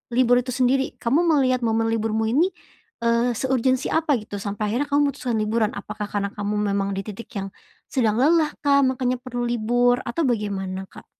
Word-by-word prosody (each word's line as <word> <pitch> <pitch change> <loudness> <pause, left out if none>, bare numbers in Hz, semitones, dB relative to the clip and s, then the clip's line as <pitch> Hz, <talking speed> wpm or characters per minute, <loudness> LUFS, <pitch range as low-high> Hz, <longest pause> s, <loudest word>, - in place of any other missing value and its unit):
libur 245 -1 +4
itu 255 - -9
sendiri? 265 +1 +1
Kamu 255 +7 +1
melihat 260 -5 +3
momen 225 0 +1
liburmu 220 0 0
ini, 320 +8 +4 0.6
eee, 235 +1 +2
seurgensi 260 +1 0
apa 315 -3 +2
gitu, 205 -1 -7
sampai 205 +1 -3
akhirnya 285 +4 0
kamu 285 0 +3
mutuskan 245 -4 -3
liburan? 215 0 +1
Apakah 210 -1 -5
karena 200 -1 -2
kamu 205 0 -3 0.2
memang 200 0 0
di 195 - -2
titik 215 +2 -8
yang 195 -1 -4 0.4
sedang 225 -5 +1
lelah 310 +2 +3
kah 280 -1 +4
makanya 255 -1 0
perlu 245 -2 -4
libur, 245 +1 +2
atau 320 +7 -1
bagaimana, 195 -5 -2
Kak? - - -14
240 Hz, 175 wpm, -23 LUFS, 215-260 Hz, 0.6 s, libur